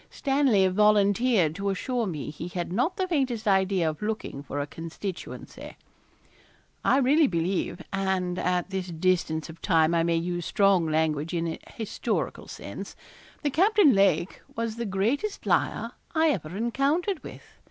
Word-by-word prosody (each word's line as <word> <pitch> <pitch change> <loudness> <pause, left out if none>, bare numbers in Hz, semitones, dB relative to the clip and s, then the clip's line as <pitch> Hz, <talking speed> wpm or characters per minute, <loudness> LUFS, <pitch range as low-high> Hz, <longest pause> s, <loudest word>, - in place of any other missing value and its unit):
Stanley 270 -9 +2
volunteered 205 -1 +3
to 200 +3 -2
assure 235 +4 -1
me 150 -5 -4
he 160 +3 -7
had 175 0 -4
not 255 - 0
the 375 -1 0
faintest 260 -10 -1
idea 190 -3 +3
of 155 -1 -3
looking 215 -9 -3
for 145 0 -5
a 145 - -1
constituency. 165 +5 -7 1.1
I - - +4
really 280 +3 +4
believe 175 0 -1
and 190 -2 -1
at 180 +1 0
this 190 -1 -3
distance 165 -2 0
of 165 0 -12
time 165 -3 +3
I 170 - +3
may 170 0 +1
use 175 +1 -2
strong 195 -2 +3
language 155 +1 0
in 170 0 -1
a 160 - -5 0.2
historical 220 -3 -3
sense - - -8 0.5
that 290 -2 0
Captain 390 -3 +5
Lake 195 -2 +2
was 230 -1 -3
the 235 - -2
greatest 230 - -1
liar - - +1 0.2
I 320 0 +4
ever 175 - -4
encountered 285 - 0
with. - - -10
195 Hz, 155 wpm, -27 LUFS, 170-240 Hz, 1.1 s, Captain